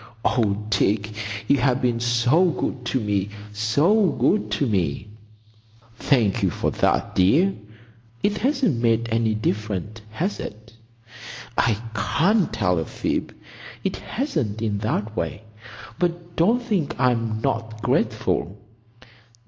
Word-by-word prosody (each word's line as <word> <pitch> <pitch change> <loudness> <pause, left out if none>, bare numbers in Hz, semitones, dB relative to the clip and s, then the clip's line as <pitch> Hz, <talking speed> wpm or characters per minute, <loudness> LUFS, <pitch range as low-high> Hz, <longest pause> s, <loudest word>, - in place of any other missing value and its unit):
Oh, 105 -3 +1
Dick, 105 0 +1 0.4
you 140 - +4
have 125 0 +2
been 120 -3 0
so 120 +8 +3
good 135 -7 -2
to 130 - 0
me!—so 105 - +1
good 210 - +1
to 145 - +1
me!" 95 - -1 0.9
"Thank 115 -5 +2
you 95 - +3
for - - -1
that, - - +1
dear. 150 - +4 0.7
It 210 0 +1
hasn't 250 - +1
made 115 0 +2
any 115 -1 +1
difference, 110 0 -3
has 175 - -2
it?" 110 +2 -8 0.8
"I 110 -3 +2
can't 175 - +2
tell 100 -6 +1
a 80 - -2
fib. - - -3 0.5
It 95 - -1
hasn't—in 110 - -2
that 105 +1 -2
way. 105 - -3 0.6
But 175 -1 -2
don't 230 +9 +3
think 195 - -1
I'm 115 -4 +1
not 110 0 -3
grateful." 95 +4 0
115 Hz, 120 wpm, -23 LUFS, 105-160 Hz, 0.9 s, you